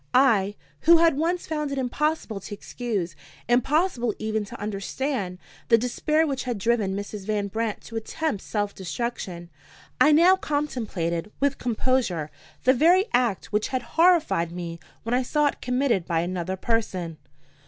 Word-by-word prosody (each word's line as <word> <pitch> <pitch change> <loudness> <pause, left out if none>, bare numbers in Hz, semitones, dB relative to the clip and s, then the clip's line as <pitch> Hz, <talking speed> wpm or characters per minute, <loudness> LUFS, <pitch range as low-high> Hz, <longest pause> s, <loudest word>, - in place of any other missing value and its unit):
I, 215 -7 +4 0.3
who 340 - +10
had 330 -2 +4
once 340 +4 0
found 300 -2 -2
it 275 - -3
impossible 265 -3 -1
to 200 - -8
excuse, 200 -7 -4 0.3
impossible 245 - +2
even 220 0 -1
to - - -10
understand, 205 0 -3 0.3
the 230 - +6
despair 305 +7 +1
which 275 -4 -2
had 245 -3 -2
driven 205 -2 +1
Mrs. 205 0 -6
Van 205 -2 0
Brandt 220 +1 -2
to 230 - -11
attempt 225 0 -2
self 205 -2 -2
destruction 185 -3 -5 0.5
I 300 - +6
now 345 +5 +6
contemplated 210 - -2
with 280 0 +1
composure 230 - 0 0.3
the 260 - +5
very 345 +8 +5
act 240 -6 +1
which 210 0 +1
had 255 -2 -2
horrified 330 - +4
me 170 -1 -6 0.2
when 230 - -2
I 250 - +3
saw 295 +4 +1
it 290 - -1
committed 250 -8 +1
by 165 -1 +1
another 180 +1 -2
person. 185 -7 -2
235 Hz, 155 wpm, -25 LUFS, 195-280 Hz, 0.5 s, who